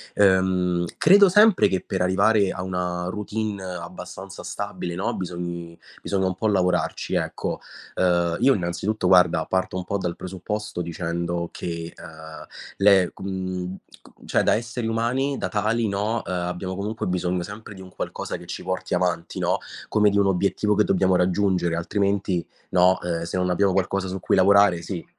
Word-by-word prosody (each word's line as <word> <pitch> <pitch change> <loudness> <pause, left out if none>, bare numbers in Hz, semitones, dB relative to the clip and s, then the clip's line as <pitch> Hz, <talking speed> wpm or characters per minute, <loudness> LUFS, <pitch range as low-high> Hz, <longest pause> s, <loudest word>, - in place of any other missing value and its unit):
Ehm, 95 -3 +3
credo 195 +3 +7
sempre 210 +1 +6
che 95 -2 -1
per 95 -2 -2
arrivare 100 +2 +3
a 90 - -4
una 90 -1 -2
routine 105 0 -3
abbastanza 90 +1 -8
stabile, 85 -1 -5
no, 95 - -2
bisogni 85 -2 -5 0.2
bisogna 95 -1 -1
un 95 - 0
po' 110 +4 -2
lavorarci, 90 -3 0
ecco. - - -2 0.3
Ehm, 85 -2 +1
io, 135 +2 +5
innanzitutto, 95 +3 -2
guarda, 90 -3 +5
parto 95 0 -1
un 90 - -3
po' 100 +1 -2
dal 90 -2 -3
presupposto 95 +2 -5
dicendo 85 0 -3
che, 85 -1 -5
ehm, 80 0 -11 0.3
le 100 -2 +5
com 95 -1 -4 0.2
c - - -19
cioè, - - +2
da - - +3
esseri 115 +1 -3
umani, 125 +5 0
da - - -2
tali, 110 +2 0
no, 105 +3 -1
ehm, - - -5
abbiamo, 90 +1 -3
comunque, 105 +3 -3
bisogno 90 0 -1
sempre 100 +3 -9
di 95 - -11
un 95 - -11
qualcosa - - -4
che - - -12
ci - - -6
porti 95 0 -3
avanti, 90 -2 -1
no, - - +1 0.3
come 105 -1 +4
di 100 - 0
un 100 - +4
obiettivo 100 +3 +1
che 105 - +4
dobbiamo 95 -2 +2
raggiungere, 90 -1 +1
altrimenti, 100 0 0 0.2
no, 90 0 +4
ehm, 85 -1 -2
se 85 - -3
non 90 0 0
abbiamo 95 +2 +2
qualcosa 95 0 0
su 95 +1 -4
cui - - +1
lavorare 100 -2 +5
sì, 85 0 -6
95 Hz, 170 wpm, -24 LUFS, 90-100 Hz, 0.3 s, credo